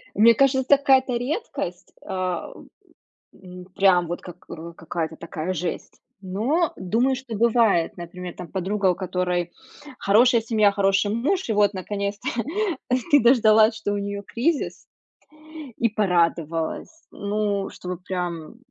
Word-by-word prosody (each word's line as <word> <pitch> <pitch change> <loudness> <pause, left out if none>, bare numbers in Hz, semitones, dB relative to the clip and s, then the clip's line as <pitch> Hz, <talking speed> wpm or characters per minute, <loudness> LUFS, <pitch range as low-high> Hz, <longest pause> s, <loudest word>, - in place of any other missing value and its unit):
Мне 230 +3 +6
кажется, 265 +1 +2
какая-то 265 -3 +3
редкость, 265 - -4
а 185 -3 -3
в - - -13 0.7
м 180 -1 -12
прям 185 -3 +4
вот 175 +1 -4
как, 180 0 -12
э, 170 +1 -8
какая-то 160 -1 -4
такая 170 +1 -5
жесть, 175 0 -5 0.2
но 235 - 0
думаю, 230 +8 +1
что 250 -3 -7
бывает, 220 -6 +2
например, 175 +1 -8
там 180 - -8
подруга, 195 +1 -1
у - - -3
которой 180 -1 -2 0.5
хорошая 235 +4 +4
семья, 215 -2 +3
хороший 195 0 +2
муж, 270 - -1
и - - +2
вот 205 -1 +3
наконец-то 200 +1 -4 0.8
ты 290 - +7
дождалась, 220 -2 +5
что 210 -2 -3
у - - -1
неё 200 0 -4
кризис, 270 +9 -2 0.9
и 235 - +2
порадовалась. 170 -5 0 0.2
Ну, 205 -1 -2
чтобы 180 -1 -7
прям, 180 0 -5
200 Hz, 130 wpm, -23 LUFS, 180-230 Hz, 0.9 s, ты